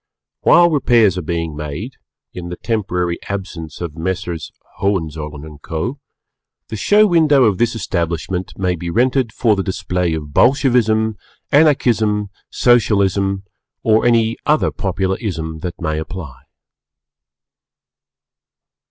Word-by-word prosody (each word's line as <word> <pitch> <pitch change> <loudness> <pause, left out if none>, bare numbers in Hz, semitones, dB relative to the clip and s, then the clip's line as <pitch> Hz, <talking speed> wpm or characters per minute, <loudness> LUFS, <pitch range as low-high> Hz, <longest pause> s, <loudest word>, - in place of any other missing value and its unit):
] - - -69
While 175 0 +5
Repairs 120 - +3
are - - -3
being 85 -1 -3
made, 75 - -6 0.4
in 85 -1 -7
the 90 - -5
temporary 90 -6 -2
absence 90 -6 -6
of 85 -4 -5
Messrs. 85 -2 -4 0.3
Hohenzollern 80 -5 -3
& - - -47
Co., 85 - -4 0.7
the - - -4
Show 205 - +4
Window 155 -7 +4
of 105 -5 +2
this 120 0 +1
establishment 85 -2 -2
may 90 -2 0
be 85 +1 -5
rented 125 +4 +1
for 110 -1 +2
the 100 - -1
display 90 -2 -1
of 75 -2 -7
Bolshevism, 110 - +3 0.3
Anarchism, 115 -9 +3 0.2
Socialism, 100 -5 +2 0.4
or 110 0 +3
any 115 -1 +2
other 150 +1 +2
popular 95 -1 -2
Ism 80 -7 -4
that 85 +1 -6
may 80 -2 -2
apply. 80 -3 -7
95 Hz, 125 wpm, -18 LUFS, 85-115 Hz, 0.7 s, While